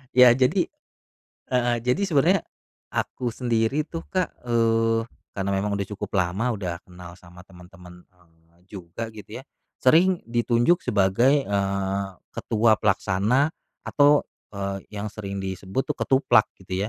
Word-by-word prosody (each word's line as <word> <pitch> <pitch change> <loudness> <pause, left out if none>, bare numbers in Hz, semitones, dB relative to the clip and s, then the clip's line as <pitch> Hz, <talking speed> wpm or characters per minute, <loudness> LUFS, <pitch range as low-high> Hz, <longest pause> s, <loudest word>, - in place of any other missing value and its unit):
Ya 125 -1 +8
jadi 130 +9 +2 0.9
heeh, 120 -1 +2
jadi 125 +11 +1
sebenarnya, 165 +4 +3 0.5
aku 125 - -3
sendiri 120 +4 0
tuh 165 +1 -6
Kak, 185 -3 -1 0.2
eee, 115 -1 +2 0.3
karena 100 0 -1
memang 100 +1 -1
udah 100 - -2
cukup 105 0 -5
lama 100 +6 0
udah 90 -3 -5
kenal 90 -1 -11
sama 90 +1 -15
temen-temen, 90 -1 -15
eee, 85 -2 -30
juga 100 +4 -7
gitu 110 +3 -9
ya - - -17 0.3
sering 170 +7 +4
ditunjuk 120 +8 +2
sebagai, 120 +8 +2
eee, 100 -1 -1 0.3
ketua 110 0 +2
pelaksana, 105 - +1 0.3
atau, 145 0 +4 0.2
eee, 100 -1 -4
yang 105 0 -5
sering 100 -2 -6
disebut 95 +5 -3
tuh - - -2
ketuplak 130 -5 +3
gitu 95 +2 -3
105 Hz, 130 wpm, -24 LUFS, 95-125 Hz, 0.9 s, Ya